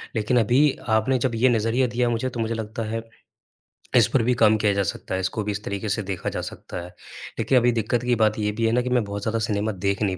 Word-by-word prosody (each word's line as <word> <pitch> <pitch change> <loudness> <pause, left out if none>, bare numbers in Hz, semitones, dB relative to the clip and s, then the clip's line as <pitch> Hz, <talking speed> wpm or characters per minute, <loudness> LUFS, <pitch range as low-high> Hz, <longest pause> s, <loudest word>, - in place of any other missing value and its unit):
लेकिन 115 +3 +2
अभी 120 +5 +3 0.3
आपने 110 +4 +2
जब 120 -1 -1
ये 125 +3 +4
नजरिया 115 +2 +1
दिया 120 0 0
मुझे 120 +2 -1
तो 120 - -7
मुझे 115 0 -1
लगता 110 0 -4
है, 115 +1 -2 0.9
इस - - +6
पर 130 - +3
भी 125 +2 +2
काम 110 -2 +4
किया 105 -1 +2
जा 100 0 +1
सकता 95 - -4
है। - - -1
इसको 95 +3 -2
भी 105 - -2
इस 105 +1 -5
तरीके 100 +1 -4
से 105 +2 0
देखा 95 -2 -3
जा - - -4
सकता - - -8
है। 85 - -8 0.5
लेकिन 130 - +3
अभी 120 0 +4
दिक्कत 115 +1 -1
की 125 0 +2
बात 110 -1 +2
ये 105 0 0
भी 115 +2 -1
है 115 - +2
ना 125 +2 +2
कि 125 - -3
मैं 125 -2 +2
बहुत 100 0 -5
ज़्यादा 110 +2 -1
सिनेमा 110 -1 -1
देख 100 0 -2
नहीं 95 -3 0
110 Hz, 265 wpm, -24 LUFS, 105-120 Hz, 0.9 s, इस